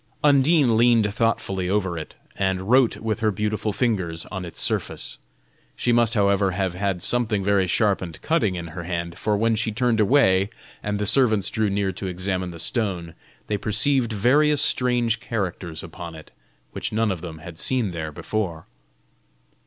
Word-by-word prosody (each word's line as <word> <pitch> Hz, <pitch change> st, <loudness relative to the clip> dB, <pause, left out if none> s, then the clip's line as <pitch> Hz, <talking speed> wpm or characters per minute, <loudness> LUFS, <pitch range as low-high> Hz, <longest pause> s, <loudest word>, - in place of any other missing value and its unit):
Undine 140 Hz, -3 st, +4 dB
leaned 115 Hz, -3 st, +4 dB
thoughtfully 100 Hz, -5 st, 0 dB
over 95 Hz, -3 st, 0 dB
it, 80 Hz, -2 st, -7 dB, 0.2 s
and 95 Hz, +1 st, -1 dB
wrote 130 Hz, -2 st, +4 dB
with 110 Hz, -1 st, -2 dB
her 110 Hz, -1 st, +2 dB
beautiful 105 Hz, +1 st, -1 dB
fingers 95 Hz, -8 st, -1 dB
on 95 Hz, -3 st, -4 dB
its 85 Hz, -, -7 dB
surface. -, -, -2 dB, 0.6 s
She 120 Hz, -, 0 dB
must, 120 Hz, -1 st, +3 dB
however, 100 Hz, -2 st, +2 dB
have 95 Hz, -1 st, -1 dB
had 95 Hz, -1 st, -2 dB
something 110 Hz, -3 st, 0 dB
very 100 Hz, -1 st, +2 dB
sharp 100 Hz, +3 st, +2 dB
and 85 Hz, -4 st, -7 dB
cutting 115 Hz, -, +1 dB
in 85 Hz, -1 st, -5 dB
her 85 Hz, +2 st, -7 dB
hand, 85 Hz, -1 st, -3 dB
for 105 Hz, -1 st, +1 dB
when 115 Hz, +2 st, +2 dB
she 110 Hz, +1 st, 0 dB
turned 115 Hz, +1 st, +1 dB
away, 100 Hz, -4 st, +4 dB, 0.3 s
and 105 Hz, -1 st, -2 dB
the 105 Hz, -, -1 dB
servants 110 Hz, -4 st, +2 dB
drew 110 Hz, -2 st, 0 dB
near 100 Hz, -1 st, 0 dB
to 95 Hz, +1 st, -5 dB
examine 90 Hz, 0 st, -2 dB
the 85 Hz, -, -9 dB
stone, 90 Hz, -2 st, -1 dB, 0.3 s
they 105 Hz, -, -1 dB
perceived 120 Hz, +3 st, +1 dB
various 145 Hz, +8 st, +3 dB
strange 120 Hz, -2 st, +2 dB
characters 95 Hz, -8 st, -4 dB
upon 85 Hz, 0 st, -8 dB
it, 80 Hz, -1 st, -13 dB, 0.4 s
which -, -, -4 dB
none 110 Hz, -1 st, +1 dB
of 90 Hz, -4 st, -4 dB
them 85 Hz, -3 st, -7 dB
had 80 Hz, +1 st, -10 dB
seen 125 Hz, -7 st, 0 dB
there 80 Hz, -2 st, -5 dB
before. 85 Hz, -1 st, -3 dB
100 Hz, 170 wpm, -23 LUFS, 90-115 Hz, 0.6 s, Undine